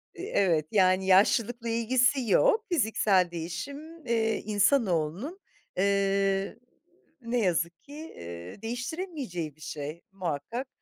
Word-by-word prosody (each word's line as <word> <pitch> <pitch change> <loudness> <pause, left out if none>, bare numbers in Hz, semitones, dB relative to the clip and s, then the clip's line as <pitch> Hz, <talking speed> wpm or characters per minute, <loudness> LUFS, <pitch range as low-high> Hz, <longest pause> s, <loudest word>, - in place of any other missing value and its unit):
i - - -8
evet, 165 -6 +2
yani 190 -2 +3
yaşlılıkla 230 +5 +3
ilgisi 245 +2 +2
yok. 460 -3 +4
Fiziksel 210 - +2
değişim, 280 - -7
eee, 225 -2 +1
insanoğlunun, 205 - +1 0.4
eee, 195 +1 +1 0.6
ne 240 +1 -1
yazık 170 -3 0
ki, 285 - -13
eee, 85 - -9
değiştiremeyeceği 245 - -4
bir 155 - -23
şey. 150 +3 -6
Muhakkak, 190 - -4
200 Hz, 105 wpm, -28 LUFS, 175-250 Hz, 0.6 s, yok